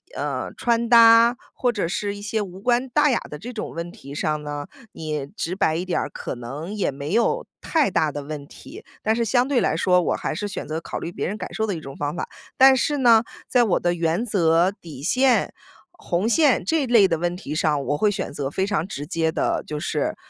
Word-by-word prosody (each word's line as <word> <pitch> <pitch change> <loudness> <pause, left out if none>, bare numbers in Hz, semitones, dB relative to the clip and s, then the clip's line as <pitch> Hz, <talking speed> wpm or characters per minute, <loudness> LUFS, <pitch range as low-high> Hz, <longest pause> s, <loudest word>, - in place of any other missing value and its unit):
呃， - - -3
穿 235 -1 +1
搭 230 +1 +7 0.2
或 245 -1 0
者 200 -7 -2
是 200 +2 -2
一 205 - -9
些 215 +1 -1
无 190 -2 -7
关 245 +4 +1
大 295 +3 +3
雅 240 - +2
的 150 - -7
这 245 +8 -8
种 215 - -5
问 170 +1 -6
题 145 -9 -11
上 150 0 -1
呢， 145 -1 -5 0.3
你 150 -3 -4
直 170 +4 -4
白 160 -4 +1
一 175 +3 -2
点 185 - 0
儿， - - -3
可 - - -6
能 140 - -7
也 210 -2 0
没 140 +5 -5
有 235 - +1 0.2
太 310 - +1
大 155 -3 +1
的 145 0 -6
问 145 -1 -7
题。 320 - -12 0.2
但 220 +1 +2
是 235 - 0
相 245 +3 +2
对 275 -3 +2
来 - - +1
说， 180 +1 +3
我 - - 0
还 - - -3
是 205 +6 -3
选 205 - -6
择 160 +2 -3
考 - - -6
虑 170 - -5
别 - - -3
人 205 +3 -4
感 - - -7
受 220 - -1
的 200 - -1
一 - - -5
种 135 -2 -9
方 145 +2 -3
法， - - -4 0.3
但 265 0 +8
是 290 +3 0
呢， 235 -4 +6 0.3
在 245 -1 +4
我 210 -6 +2
的 175 0 +1
原 170 +6 0
则、 175 -3 +3
底 160 -9 -11
线、 255 - +2 0.4
红 200 - -2
线 290 +2 +3
这 315 -5 +1
类 230 -5 +6
的 165 -3 -1
问 175 +1 -1
题 150 - -6
上， 155 -2 +1
我 145 - 0
会 210 +6 +3
选 195 - -4
择 140 -2 -3
非 190 +6 -1
常 195 -4 -1
直 145 -6 -6
接 160 -1 0
地 - - -1
就 150 -1 -4
是， - - -2
190 Hz, 255 characters per minute, -23 LUFS, 155-235 Hz, 0.4 s, 但